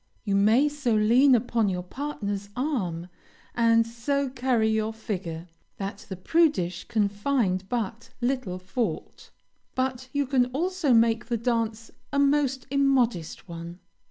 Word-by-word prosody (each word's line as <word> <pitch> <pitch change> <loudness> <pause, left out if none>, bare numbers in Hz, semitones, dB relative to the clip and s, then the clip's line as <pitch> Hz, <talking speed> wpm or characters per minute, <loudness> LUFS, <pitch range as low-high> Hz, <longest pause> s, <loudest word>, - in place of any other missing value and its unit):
You 200 -3 0
may 220 +8 +4
so 290 -6 0
lean 245 +6 +5
upon 230 -2 +1
your 180 -1 -2
partner's 205 -4 -4
arm, 195 - -2 0.5
and 230 -1 +4
so 265 +5 -1
carry 245 -3 +1
your 220 0 0
figure, 180 -7 -5 0.3
that 195 0 -6
the 190 - -4
prudish 185 - +1
can 210 -2 +1
find 200 -3 -1
but 230 -1 -3
little 250 -7 -1
fault, 185 0 -4 0.5
but 260 0 -2
you 285 0 0
can 255 -2 +2
also 350 0 0
make 230 -1 +3
the 235 -1 0
dance 225 -1 -1 0.2
a - - -1
most 280 -2 +2
immodest 255 - +1
one. 170 0 -8
230 Hz, 135 wpm, -26 LUFS, 200-265 Hz, 0.5 s, lean